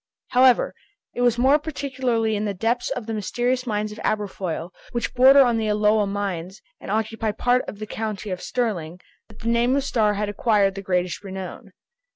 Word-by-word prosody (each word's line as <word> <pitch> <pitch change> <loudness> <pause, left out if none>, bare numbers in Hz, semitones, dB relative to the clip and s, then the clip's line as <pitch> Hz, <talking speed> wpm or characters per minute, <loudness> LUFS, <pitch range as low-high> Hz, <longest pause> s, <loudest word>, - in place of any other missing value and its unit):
However, 255 0 +4 0.4
it 245 - -3
was 240 -1 +3
more 270 +5 +4
particularly 260 -7 -1
in 210 +1 -1
the 200 -1 -2
depths 230 +6 0
of 250 -4 -4
the 225 - -4
mysterious 245 +4 -1
mines 210 -1 -1
of 210 - -9
Aberfoyle, 190 -5 -2 0.2
which 235 - -2
border 265 +2 +7
on 240 -2 +1
the 220 -1 -1
Alloa 210 0 +2
mines 195 -2 -4 0.2
and - - -9
occupy 220 +1 -1
part 245 +4 +1
of - - -8
the 215 - -5
county 215 -2 -4
of 180 - -4
Stirling, 180 -9 -2 0.3
that - - -16
the 230 - -1
name 235 +2 +3
of 280 - +1
Starr 215 -6 +1
had 210 +1 -1
acquired 205 -1 +2
the 195 - -6
greatest 180 -5 -1
renown. 190 -1 -7
215 Hz, 190 wpm, -23 LUFS, 200-245 Hz, 0.4 s, border